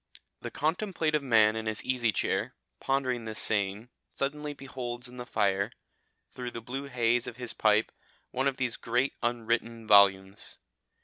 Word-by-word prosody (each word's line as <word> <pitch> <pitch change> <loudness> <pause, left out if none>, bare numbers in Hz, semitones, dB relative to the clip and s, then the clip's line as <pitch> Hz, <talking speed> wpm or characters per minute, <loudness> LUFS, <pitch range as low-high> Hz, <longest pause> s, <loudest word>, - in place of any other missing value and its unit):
The - - -4
contemplative 160 -2 0
man 110 -5 +4
in 110 0 -3
his 110 0 -1
easy 125 -3 +2
chair, - - -1 0.2
pondering 130 -3 0
this 110 0 -5
saying, 100 +2 0 0.2
suddenly 150 +2 -2
beholds 125 -3 -6
in 125 0 -12
the 125 0 -7
fire, 100 -2 +1 0.6
through 125 -1 -5
the 115 - -6
blue 135 +5 -5
haze 120 -2 +1
of 120 - -7
his 125 -2 -4
pipe, 110 0 +3 0.4
one 130 +2 0
of 135 -1 0
these 125 -3 -1
great 125 +4 0
unwritten 115 -1 -1
volumes. 100 -1 +4
120 Hz, 150 wpm, -29 LUFS, 110-130 Hz, 0.6 s, man